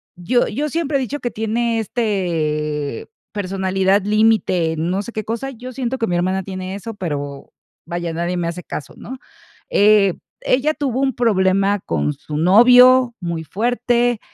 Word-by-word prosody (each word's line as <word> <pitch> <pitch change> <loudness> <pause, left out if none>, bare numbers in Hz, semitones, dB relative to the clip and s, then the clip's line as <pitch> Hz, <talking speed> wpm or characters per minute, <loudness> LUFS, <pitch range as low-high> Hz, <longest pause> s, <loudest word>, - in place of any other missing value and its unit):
yo 240 +8 +1
yo 300 +2 -2
siempre 310 -2 -1
he - - -1
dicho 270 +3 -3
que 240 -4 -3
tiene, 225 +1 -1
este, 160 - -2 0.2
personalidad 190 0 0
límite, 210 -6 +2
no 180 +5 -1
sé 235 - -8
qué 215 -2 -4
cosa, 235 +6 -4
yo 255 0 -9
siento 260 0 -3
que 230 - 0
mi 175 -4 -1
hermana 185 +2 0
tiene 185 0 -6
eso, 220 +3 -7
pero, 145 -7 -5 0.3
vaya, 170 -1 -4
nadie 175 +2 -2
me 170 - -1
hace 170 +1 -5
caso, 145 - -7
¿no? 260 +1 -9 0.5
Eh, 205 -2 +5 0.3
ella 290 +5 +1
tuvo 265 -3 -2
un 265 -3 0
problema 195 -3 +2
con 75 - -2
su 150 -1 -7
novio 245 +7 +6
muy 170 -3 -4
fuerte, 240 +5 0
205 Hz, 160 wpm, -19 LUFS, 175-240 Hz, 0.5 s, novio